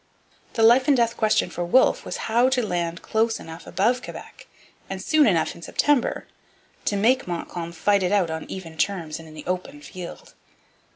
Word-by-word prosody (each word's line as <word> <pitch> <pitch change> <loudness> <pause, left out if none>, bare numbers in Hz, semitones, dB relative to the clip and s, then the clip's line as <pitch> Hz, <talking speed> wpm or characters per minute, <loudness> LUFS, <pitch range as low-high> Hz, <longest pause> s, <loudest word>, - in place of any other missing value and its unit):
The 225 - +1
life 240 +4 +6
and 285 -3 +5
death 235 -1 +2
question 215 -5 +1
for 175 - -3
Wolfe 215 +10 +3
was - - -5
how 240 +3 +3
to 255 -3 +1
land 170 -3 -2
close 225 +1 0
enough 165 +1 -10
above 230 +8 +1
Quebec - - -10 0.4
and 195 - -4
soon 310 +6 +3
enough 170 -6 +2
in - - -14
September 280 +8 +1 0.6
to 205 - +1
make 240 +5 +2
Montcalm 170 -1 -5
fight 200 +4 +2
it 180 0 0
out 190 -5 +2
on 160 0 -5
even 165 -4 -8
terms 170 -6 -1
and 165 - -12
in 155 - -13
the 155 - -9
open 185 +11 -4
field. 185 -11 -10
195 Hz, 185 wpm, -24 LUFS, 170-235 Hz, 0.6 s, life